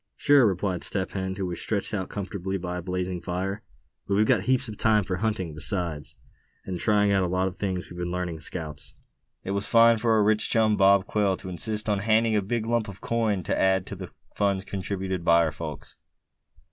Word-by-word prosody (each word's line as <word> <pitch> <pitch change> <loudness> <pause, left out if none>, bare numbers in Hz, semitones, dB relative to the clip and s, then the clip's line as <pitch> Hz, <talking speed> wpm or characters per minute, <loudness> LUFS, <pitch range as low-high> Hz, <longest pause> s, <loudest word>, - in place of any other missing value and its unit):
"Sure," 140 -5 +5
replied 95 -2 -1
Step 95 -2 -1
Hen, 95 -1 -3
who 95 -1 -3
was 90 -2 -3
stretched 105 -1 -2
out 95 -3 -2
comfortably 95 -1 -4
by 90 -1 -4
a - - -5
blazing 90 0 -3
fire. 95 +3 -3 0.5
"But 100 - +1
we've 105 +2 +4
got - - +2
heaps 130 0 +2
of 110 - -6
time 110 -2 +3
for 90 0 -3
hunting 95 -5 -2
besides, 75 -1 -3 0.5
and 90 -2 -4
trying 105 0 +3
out 100 -1 +3
a 90 - +1
lot 90 +1 0
of 95 - -5
things 95 -3 -3
we've 90 - -10
been 90 0 -2
learning 90 -2 -3
as 80 - -4
scouts. 75 -3 -6 0.5
It 95 - -4
was 100 +1 -2
fine 115 -1 +6
for 115 0 +2
our 110 -1 +4
rich 110 +1 +2
chum, 110 -2 +3
Bob 100 -1 +5
Quail, 100 -3 +1
to 95 - -9
insist 105 +4 -3
on 105 -2 +1
handing 110 +2 +2
in 105 - +3
a - - -1
big 110 +3 -2
lump 115 -1 0
of 100 -1 -9
coin 110 -5 0
to - - -1
add 95 -1 +3
to - - -7
the - - -8 0.2
funds 100 -2 0
contributed 95 -2 -3
by 85 0 +5
our 80 - 0
folks. 75 -1 -8
95 Hz, 220 wpm, -26 LUFS, 90-105 Hz, 0.5 s, fine